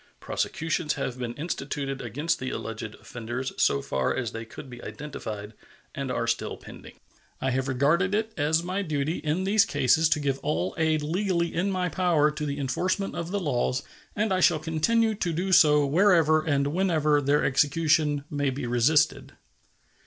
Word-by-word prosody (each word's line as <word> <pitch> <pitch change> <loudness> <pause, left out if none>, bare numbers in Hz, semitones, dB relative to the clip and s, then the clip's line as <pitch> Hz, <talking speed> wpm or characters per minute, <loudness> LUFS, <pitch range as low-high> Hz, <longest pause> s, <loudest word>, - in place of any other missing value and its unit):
Prosecutions 160 -1 -2
have 125 0 -4
been 120 -1 -4
instituted 140 -3 -4
against 145 +8 -2
the 130 - -3
alleged 115 -1 -5
offenders 120 +2 -6
so 70 - +2
far 65 -1 -1
as 120 -4 -2
they 115 0 -6
could 125 +5 -10
be 120 -1 -11
identified, 110 -8 -7 0.4
and - - -4
are - - -1
still - - -2
pending. - - -12 0.4
I 130 - 0
have 130 +1 -1
regarded 155 +9 +2
it 220 +1 -1
as 160 +2 +1
my 185 +3 -2
duty 155 -2 -1
in 155 +4 -1
these 200 +2 +4
cases 150 - +2
to 150 - +2
give 140 -2 -1
all 90 +4 -1
aid 155 -1 +1
legally 170 +1 0
in 185 +4 0
my 185 -2 0
power 170 -3 +2
to 150 0 -4
the 140 0 -3
enforcement 180 +9 -1
of 170 -1 -4
the 205 +2 -1
laws, 130 -5 -1 0.3
and 210 -1 +1
I 185 - +1
shall 170 -3 +4
continue 165 +9 +1
to 180 -5 -2
do 185 +4 -2
so 150 -4 +6
wherever 160 -1 +4
and 140 -3 +1
whenever 155 -5 +2
their 145 +1 +2
execution 150 +1 +2
may 145 -1 0
be 130 0 -4
resisted. 125 +6 +2
150 Hz, 175 wpm, -26 LUFS, 135-170 Hz, 0.4 s, so